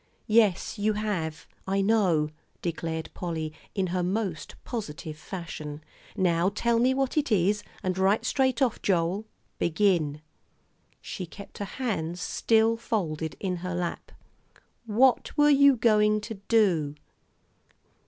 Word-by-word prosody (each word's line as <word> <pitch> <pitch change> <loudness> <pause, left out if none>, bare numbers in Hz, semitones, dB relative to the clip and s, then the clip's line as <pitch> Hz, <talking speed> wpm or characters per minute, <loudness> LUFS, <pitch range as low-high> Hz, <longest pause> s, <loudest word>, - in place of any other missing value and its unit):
"Yes, 215 -2 +3
you 215 +1 +2
have, 185 -7 -3 0.2
I 195 +1 +1
know," 190 -8 +3 0.3
declared 165 -1 -3
Polly, 160 -3 -4 0.2
in 195 - +1
her 180 - +1
most 185 -2 -2
positive 165 -8 -5
fashion; 155 -3 -7 0.3
"now 175 -1 +2
tell 230 +3 +1
me 255 +2 +3
what 270 +2 -1
it 295 -5 +1
is, 205 +1 +3 0.2
and 185 -1 0
right 195 +3 +3
straight 265 -1 +2
off, 245 -4 0
Joel. 185 +2 +1 0.3
Begin." 165 -4 +1 0.8
She 185 - -6
kept 200 +4 -11
her 205 - -2
hands 180 -9 -2
still 225 +4 +2
folded 160 -9 -2
in 185 -2 -2
her 180 0 -4
lap. 175 -1 -4 0.8
"What 250 +7 +3
were 295 0 +6
you 280 -1 +6
going 215 -2 +3
to 225 +2 -6
do?" 175 -10 +3
195 Hz, 130 wpm, -27 LUFS, 165-225 Hz, 0.8 s, were